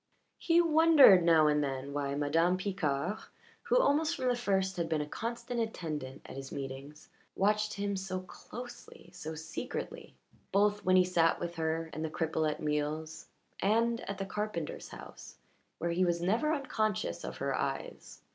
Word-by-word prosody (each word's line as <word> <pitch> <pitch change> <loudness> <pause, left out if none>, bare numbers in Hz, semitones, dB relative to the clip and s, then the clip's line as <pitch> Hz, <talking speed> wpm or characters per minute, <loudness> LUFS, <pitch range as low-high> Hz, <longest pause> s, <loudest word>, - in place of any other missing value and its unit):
He 335 0 +3
wondered 315 - +7
now 165 -2 +5
and 150 0 +3
then 135 0 -4
why 140 -1 -2
Madame 165 +5 +2
Picard, 185 -1 -1 0.4
who 480 +1 +2
almost 320 -7 +3
from 255 -2 0
the 245 - +2
first 190 -5 0
had 170 -2 -1
been 160 -1 +1
a - - -2
constant 235 - -4
attendant 155 - -4
at - - -9
his 135 0 -7
meetings, 140 +2 -7 0.3
watched 210 +2 +1
him 200 0 -2
so 190 -1 -3
closely, 245 +6 -11
so 160 -3 -6
secretly 160 +10 -6 0.4
both 205 +1 +2
when 185 0 +4
he 185 - +7
sat 170 -2 +2
with 170 0 -4
her 160 0 -1
and 155 - -4
the 160 - -2
cripple 160 0 0
at 150 - -4
meals 155 +1 -2 0.3
and 230 +3 +2
at 200 - -3
the 195 - -3
carpenter's 210 -6 -4
house, - - -11 0.4
where 170 +1 -1
he 180 +2 +2
was 175 -1 +1
never 220 - +1
unconscious 220 -9 -1
of - - -6
her - - -1
eyes. - - -4
180 Hz, 165 wpm, -31 LUFS, 155-215 Hz, 0.4 s, wondered